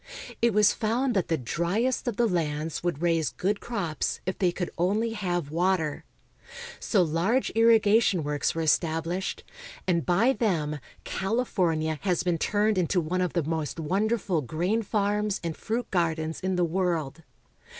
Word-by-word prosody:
It 235 0 +4
was 210 0 +4
found 240 +4 0
that 190 -4 0
the 165 - +1
driest 180 - -1
of 240 - -1
the 240 - +3
lands 160 -4 -2
would 175 -2 -2
raise 165 -3 +2
good 200 +2 -1
crops 185 -10 -2
if 185 - -3
they 180 -3 +3
could 175 0 -4
only 210 +6 +1
have 175 -8 -2
water. 170 -3 0 0.7
So 195 -5 +2
large 175 +11 +1
irri 225 0 +6
gation 205 -5 +3
works 145 +1 -1
were 165 - -1
established, 165 +3 0 0.4
and 170 -3 +2
by 210 +9 +3
them 160 - -1 0.2
California 180 -8 -1
has 180 -3 0
been 175 -2 0
turned 210 +1 +1
into 180 +1 +1
one 175 +3 -1
of 180 - -1
the 170 - +1
mOst 160 +1 -3
wonderful 195 +1 0
grain 175 - -1
farms 210 -1 0
and 165 -2 -3
fruit 230 +2 -3
gardens 160 -3 0
in 190 0 -1
the 180 -1 +2
world. 165 -4 -1
180 Hz, 160 wpm, -27 LUFS, 165-210 Hz, 0.7 s, irri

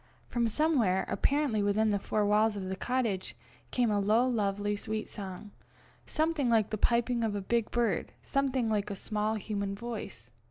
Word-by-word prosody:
From 235 -1 +1
somewhere, 230 - +2
apparently 280 -7 +1
within 210 +2 +2
the 200 - +1
four 210 +1 0
walls 210 +1 +3
of 200 - -4
the 190 - -2
cottage, 225 -3 -1 0.3
came 245 -3 +1
a 205 - +2
low 215 +5 +3
lovely 205 -3 0
sweet 215 +1 -4
song 195 +1 -7 0.6
something 310 -4 +1
like 220 -3 +3
the - - 0
piping 235 +1 +2
of 215 -2 0
a - - -1
big 230 +3 0
bird, 240 -1 0
something 270 -3 0
like 210 -2 0
a 200 - -3
small 215 +2 -1
human 200 -2 -3
voice. 205 - -7
215 Hz, 170 wpm, -30 LUFS, 205-240 Hz, 0.6 s, walls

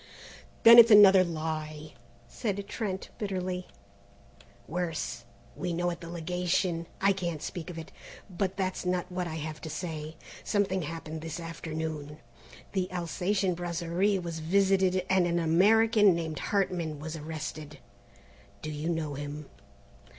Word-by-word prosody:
"Then 230 +1 +11
it's 230 0 +9
another 200 -3 +9
lie!" 155 -2 -4 0.3
said 200 - -3
Trent 195 -5 -4
bitterly. 185 -3 -3 1.0
"Worse 160 -8 -3 0.3
we 180 -1 -3
know 175 +1 0
at 170 - -7
the 170 - -8
Legation 175 0 -1
I 195 +1 +4
can't 175 -4 -3
speak 165 +2 -6
of 175 - -7
it. 160 - -8 0.4
But 190 0 -3
that's 185 -1 -2
not 180 0 -1
what 180 -1 -2
I 160 - -5
have 155 -1 -5
to 160 - -6
say. 155 -1 -5 0.3
Something 195 -3 0
happened 160 0 -6
this 165 +1 -5
afternoon. 160 -2 -5 0.5
The 185 -1 -1
Alsatian 180 +2 0
Brasserie 175 +3 0
was 170 -3 -5
visited 190 +2 +2
and 190 -2 +3
an 170 0 0
American 205 +4 +5
named 160 -3 -3
Hartman 175 -6 -1
has 155 +1 -6
been 155 - -8
arrested. 155 -1 -6 0.9
Do 155 - -4
you 150 +2 -3
know 160 -3 -2
him?" 145 +1 -7
170 Hz, 140 wpm, -29 LUFS, 160-190 Hz, 1.0 s, Then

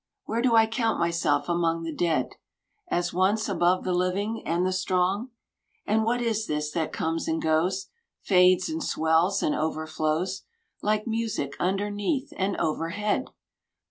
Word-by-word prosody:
Where 230 +1 -1
do 245 -2 +3
I 225 0 +7
count 225 0 0
myself 165 -4 +1
among 165 -1 0
the 165 -1 -4
dead. 165 0 0 0.6
As 175 0 0
once 195 +5 +2
above 180 -1 +2
the 185 - -1
living 190 +5 -1
and 170 +2 +1
the 185 - 0
strong? 185 +5 0 0.6
And 220 +1 +2
what 240 +2 0
is 225 -2 -1
this 150 0 -2
that 160 -1 -2
comes 165 +1 -2
and 160 0 0
goes. 170 +5 0 0.3
Fades 180 -1 +4
and 320 -1 -3
swells 160 - +2
and 150 - +2
overflows, 160 +3 -1 0.4
Like 210 0 0
music 225 - -2
underneath 205 - -1
and 195 +1 -1
overhead 175 - -1
185 Hz, 145 wpm, -26 LUFS, 165-215 Hz, 0.6 s, I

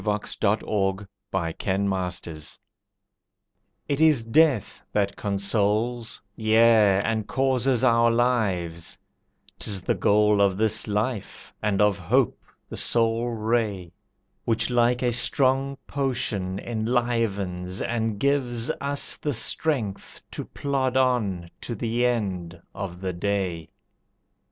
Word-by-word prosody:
The 105 -1 +1 0.2
Death 105 +1 +1
of 95 -1 -1 0.3
the 85 -4 -2
Poor 95 -3 -1 1.5
It 145 +1 -1
is 155 -7 +5
Death 135 - +2
that 100 -1 0
consoles 105 +3 0 0.2
yea, 110 -3 +4
and 110 -2 -1
causes 130 -2 +1
our 115 -2 +4
lives; 100 -9 0 0.6
'Tis 100 -4 +1
the - - +1
goal 105 0 +3
of 95 -2 +3
this 110 0 +1
Life 105 +1 -3
and 105 -2 0
of 105 -2 +3
Hope 85 - +1 0.3
the - - -8
sole 115 0 +2
ray, 110 -5 -1 0.5
Which 115 +2 0
like 120 +1 +2
a 120 - +2
strong 135 +3 +2
potion 120 -9 -1
enlivens 110 -5 -1
and 110 -3 -1
gives 130 -4 0
Us 140 0 +1
the 145 - -2
strength 120 -4 -2
to - - -5
plod 135 -2 -1
on 105 -10 0
to 120 - -4
the 120 +3 0
end 95 -8 -2
of 90 -3 -6
the 95 -1 -2
day. 90 -3 -2
110 Hz, 115 wpm, -25 LUFS, 100-120 Hz, 1.5 s, is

